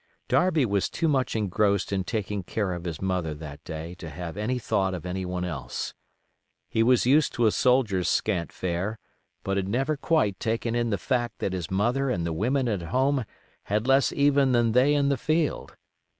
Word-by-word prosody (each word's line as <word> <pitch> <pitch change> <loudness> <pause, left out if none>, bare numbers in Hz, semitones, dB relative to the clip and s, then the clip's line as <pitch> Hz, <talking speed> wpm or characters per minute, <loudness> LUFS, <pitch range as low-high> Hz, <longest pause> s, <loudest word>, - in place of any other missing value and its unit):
Darby 165 -7 +3
was 100 -3 0
too 165 - -1
much 135 -6 +1
engrossed 100 -1 +1
in 95 -1 0
taking 105 -1 -3
care 95 +1 -2
of 85 0 -6
his 80 -3 -4
mother 90 -5 -1
that 75 -1 -9
day 80 +2 -6
to 85 -2 -9
have 85 +1 -6
any 110 +5 -1
thought 95 -5 0
of 90 - -7
any 90 +1 -3
one 90 0 -2
else. 80 -7 -4 0.7
He 110 - 0
was 120 +1 +4
used 145 +4 +4
to 120 - +1
a 110 - +5
soldier's 115 -9 +2
scant 90 -6 0
fare, 95 +4 -3 0.5
but 95 0 -1
had 95 -1 -1
never 135 +9 0
quite 140 -9 +1
taken 115 0 -1
in 120 -1 0
the 100 - 0
fact 120 +3 -1
that 95 - -2
his 90 -3 -4
mother 120 +8 +1
and 85 -7 -1
the 85 - -2
women 125 - 0
at 105 -6 -1
home 130 +9 +1 0.4
had 105 +2 0
less 135 +1 +4
even 140 -2 +3
than 120 -1 +3
they 130 +5 +4
in 140 -1 +2
the 140 - +1
field. 155 +1 -1
105 Hz, 195 wpm, -26 LUFS, 90-130 Hz, 0.7 s, a